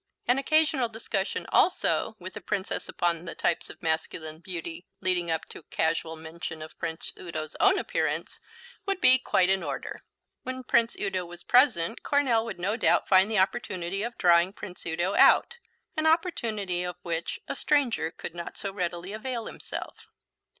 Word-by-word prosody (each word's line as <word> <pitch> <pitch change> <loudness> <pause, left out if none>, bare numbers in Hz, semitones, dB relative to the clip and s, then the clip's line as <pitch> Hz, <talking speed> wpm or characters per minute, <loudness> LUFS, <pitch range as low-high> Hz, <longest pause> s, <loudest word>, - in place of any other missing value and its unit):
An 245 +2 +4
occasional 300 -4 +2
discussion 215 -3 -3
also 350 -10 +2
with 185 -1 -8
the 210 - -7
Princess 195 +1 -2
upon 170 -1 0
the 170 - -6
types 170 - 0
of - - -12
masculine 160 -1 -2
beauty, 170 -1 -7
leading 180 -2 0
up 160 -1 -1
to - - -10
casual 160 +1 -1
mention 160 0 -7
of 155 - -12
Prince 160 +1 -4
Udo's 155 -3 -5
own 390 0 +5
appearance, - - -2 0.5
would 390 -1 0
be 260 -5 +6
quite 185 -6 +3
in 190 0 +2
order. - - -5 0.4
When 255 0 -5
Prince 235 -1 +2
Udo 190 -3 -1
was 175 0 -11
present 235 - +4
Coronel 255 -6 +2
would - - -5
no 200 +5 0
doubt - - +3
find 190 +1 +5
the 220 - 0
opportunity 190 -2 0
of 235 +2 -4
drawing 175 +1 +4
Prince 180 -4 -9
Udo 175 +4 0
out, 475 - +5 0.4
an 310 0 +1
opportunity 230 - +1
of 180 -1 -4
which 170 -1 -3
a - - -2
stranger 260 - +1
could 165 - -8
not 170 0 -7
so 195 -2 -3
readily 180 0 -3
avail 235 +1 -4
himself. - - -7
190 Hz, 165 wpm, -28 LUFS, 170-235 Hz, 0.5 s, be